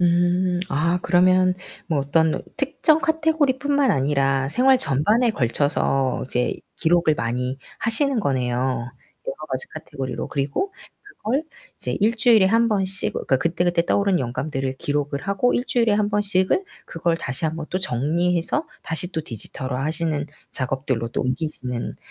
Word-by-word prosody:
음. 175 +1 +2
아, 165 +4 +1
그러면 185 0 +4 0.3
뭐 160 -4 0
어떤 155 +3 +1
특정 300 +3 +2
카테고리뿐만 290 -4 +2
아니라 135 -1 +1
생활 260 - +4
전반에 225 - +2
걸쳐서 135 - 0
이제 125 -1 0 0.2
기록을 165 -1 +3
많이 125 +2 -2 0.2
하시는 245 +2 +1
거네요. 130 -7 0 0.7
여러 - - -5
가지 - - -3
카테고리로. 135 -3 -5
그리고 140 - -1 0.3
그걸 300 - -3 0.3
이제 - - -3
1 215 +3 +3
주일에 230 -4 +5
1 230 +4 +3
번씩, 195 -3 -1
어 - - -1
그니까 130 - +1
그때그때 170 +2 +1
떠오른 200 -4 +2
영감들을 130 +1 -3
기록을 145 0 -2
하고 200 +6 +1
1 245 - 0
주일에 230 -4 +2
1 205 0 +1
번씩을 205 - +3 0.2
그걸 165 0 -1
다시 160 -1 -3
1 160 +1 -3
번 160 - -4
또 185 - 0
정리해서 175 - 0 0.2
다시 175 +1 -3
또 160 - -2
디지털화하시는 145 - -3 0.3
작업들로 130 -3 -2
또 - - -2
옮기시는 125 -2 -3
170 Hz, 315 characters per minute, -23 LUFS, 135-210 Hz, 0.7 s, 주일에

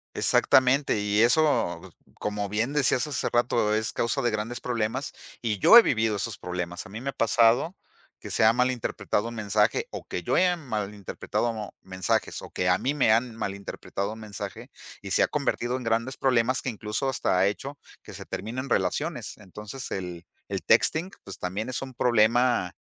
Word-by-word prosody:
Exactamente. 130 -2 +3
Y 105 +1 +1
eso, 150 +6 +2 0.2
como 105 -1 -3
bien 115 +7 -1
decías 135 -4 +2
hace 145 -4 -1
rato, 120 -3 +1
es 110 0 -1
causa 120 +4 0
de 120 -2 +1
grandes 110 +3 -3
problemas. 115 -3 -2 0.3
Y 105 -4 -1
yo 235 - +9
he - - +12
vivido 110 - +1
esos 100 +1 -3
problemas. 90 -1 -5
A - - -11
mí 110 +4 -7
me 135 - -3
ha - - -26
pasado 115 - +3 0.4
que - - -8
se - - +2
ha 110 - +7
mal 125 +2 +2
interpretado 115 -2 -2
un 120 - -7
mensaje, 105 - +1
o - - -6
que - - -4
yo - - -1
haya 180 -1 +4
mal 110 -10 -4
interpretado 110 +2 -3
mensajes 95 -2 -1
o - - -9
que 90 - -2
a 90 +1 +3
mí 140 +3 -1
me 130 -6 +3
han 115 +1 +1
mal 100 -3 -3
interpretado 100 +1 -5
un 110 - -11
mensaje 105 -3 -7 0.3
y - - -7
se - - +3
ha - - +4
convertido 120 +2 -1
en 130 - -7
grandes 115 +3 -1
problemas 130 -1 +2
que - - -1
incluso 105 +3 -2
hasta 120 -7 0
ha 95 - +4
hecho 120 +9 -3 0.2
que - - -12
se - - -8
terminen 130 +5 -5
relaciones. 120 - -1
Entonces 105 +5 -8
el 90 -3 -5 0.2
el - - -3
texting 170 +5 +3
pues, 95 -1 -8
también 100 +6 -3
es 130 - -2
un 130 -1 -8
problema 120 -4 +2
115 Hz, 190 wpm, -26 LUFS, 105-130 Hz, 0.4 s, he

